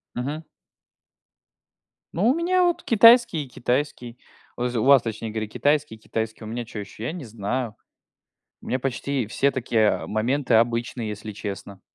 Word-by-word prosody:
Мгм. 145 +6 -4 1.7
Ну 190 +7 +1
у 250 - +5
меня 360 +3 +2
вот 350 -1 +1
китайский, 230 -6 +6
и - - -15
китайский. 125 -1 -2 0.4
Вз 125 0 -2
у 110 - +1
вас, 135 -1 +6
точнее 110 0 -4
говоря, 110 0 -3
китайский, 145 +2 0
и - - -16
китайский, 110 0 -4
а - - -7
у - - -7
меня 120 +2 -4
чё 110 - -8
еще? 105 +2 -9
Я 120 - -2
не 165 -5 -7
знаю. 110 +1 -3 0.9
У - - -12
меня 130 - 0
почти 135 -1 -2
все 135 +6 +1
такие, 115 -4 +1
а, - - -1
моменты 125 +6 0
обычные, 115 0 +1
если 105 +1 -6
честно. 100 -1 -7
120 Hz, 170 wpm, -24 LUFS, 110-145 Hz, 1.7 s, китайский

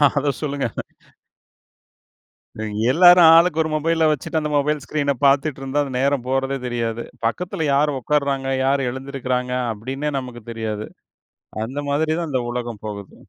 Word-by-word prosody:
அத 145 0 +1
சொல்லுங்க. 140 -2 -2 2.3
எல்லாரும் 175 +2 +8
ஆளுக்கு 165 -1 +4
ஒரு 160 - -1
மொபைல 160 +1 +2
வச்சுட்டு 150 +2 -1
அந்த 150 -1 -3
மொபைல் 145 +1 +1
ஸ்கிரீனப் 140 -3 -1
பார்த்துட்டு 140 +1 +2
இருந்தா 135 +2 0
அந்த 135 -2 -6
நேரம் 135 -2 +1
போறதே 135 +1 0
தெரியாது. 115 -1 -2 0.2
பக்கத்துல 160 +6 -2
யார் 145 +1 +2
ஒட்காருறாங்க, 140 0 0 0.2
யார் 135 -1 +1
எழுந்திருக்கிறாங்க 130 -1 -3 0.2
அப்படீன்னே 130 +7 -4
நமக்குத் 120 -3 -7
தெரியாது. 110 -2 -4 0.8
அந்த 130 +5 -6
மாதிரிதான் 160 +3 0
இந்த 130 -2 0
உலகம் 120 -3 -5
போகுது. 100 -2 -7
135 Hz, 130 wpm, -21 LUFS, 125-150 Hz, 2.3 s, எல்லாரும்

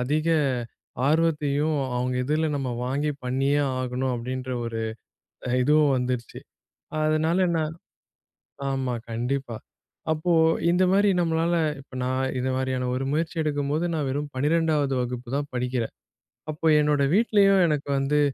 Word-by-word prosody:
அதிக 150 +6 0 0.8
ஆர்வத்தையும் 155 -1 +1 0.2
அவங்க 125 +1 -1
இதில 155 +3 +1
நம்ம 130 -3 -2
வாங்கி 145 +4 -1
பண்ணியே 135 +3 +1 0.2
ஆகணும். 130 +1 -2
அப்படின்ற 130 +2 -4
ஒரு 115 -1 -3 0.8
இதுவும் 150 +1 +4
வந்துடுச்சு. 125 -2 -3 0.6
அதனால 160 +4 +2
நான் 155 0 -1 1.0
ஆமா 130 -2 -1 0.2
கண்டிப்பா, 120 +1 -2 0.6
அப்போ 160 +3 0 0.4
இந்த 180 +2 +3
மாரி 205 +1 +4
நம்மளால 165 0 +1 0.3
இப்போ 135 -1 -15
நான் 130 +1 -1
இந்த 130 +1 -1
மாரியான 130 -1 -1
ஒரு 135 - -2
முயற்சி 160 +2 -1
எடுக்கும்போது 145 +2 -1
நான் 150 -3 -1
வெறும் 145 +2 -3
12ஆவது 150 0 +1
வகுப்பு 125 0 -4
தான் 145 0 -3
படிக்கிறேன். 125 -2 -2 0.6
அப்போ 155 +2 -6
என்னோட 150 -1 +2
வீட்லயும் 200 -4 +4
எனக்கு 150 -2 -1
வந்து 140 +2 +1
145 Hz, 125 wpm, -25 LUFS, 130-155 Hz, 1.0 s, இதுவும்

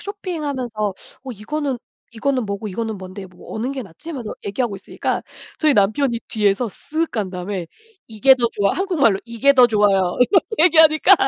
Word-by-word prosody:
쇼핑하면서 310 - -4 0.5
어 265 - -7
이거는 270 +6 -3 0.4
"이거는 255 +1 -1
뭐고 200 +1 -4
이거는 220 +2 -4
뭔데 190 +1 -9
뭐 180 -1 -14
어느 240 +5 -2
게 270 -2 -5
낫지?" 230 - -11
하면서 245 -8 -5
얘기하고 200 0 -2
있으니까 - - -3 0.4
저희 305 -3 +3
남편이 230 +4 +2
뒤에서 210 +2 +1
쓱 315 - -3
간 205 -5 -3
다음에 180 -1 -5 0.4
"이게 235 +5 +5
더 240 -2 +1
좋아." 200 -1 +1
한국말로 315 - +2
"이게 235 +4 +3
더 255 -3 +7
좋아요." 200 -5 +2
이렇게 370 +10 +4 0.2
얘기하니까 315 -3 +7
235 Hz, 385 characters per minute, -20 LUFS, 200-280 Hz, 0.5 s, 더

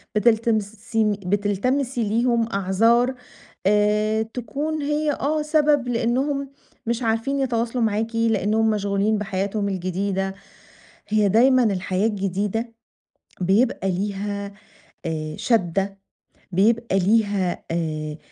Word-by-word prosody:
بتلتمسين 220 -1 +1
بتلتمسي 225 +7 0
ليهم 230 +2 +1
أعذار 225 +7 +2 0.5
آآ 210 +2 +2
تكون 265 +7 -3
هي 295 +1 0
آه 300 +3 -1
سبب 300 -4 +2
لأنهم 265 +4 0 0.4
مش 235 +1 -1
عارفين 230 +5 0
يتواصلوا 240 -2 0
معاكِ 225 +1 -1
لأنهم 220 -1 +2
مشغولين 205 0 +1
بحياتهم 200 0 -2
الجديدة، 190 +1 -2 0.7
هي 210 -1 +2
دايمًا 255 +4 +5
الحياة 195 -1 0
الجديدة 205 +3 -2 0.7
بيبقى 195 0 +2
ليها 200 +1 -3 0.5
آآ، 155 -1 -3
شَدّة 195 -3 0 0.5
بيبقى 205 +1 +2
ليها 200 -2 +1
آآ 155 -2 -3
215 Hz, 95 wpm, -23 LUFS, 195-235 Hz, 0.7 s, دايمًا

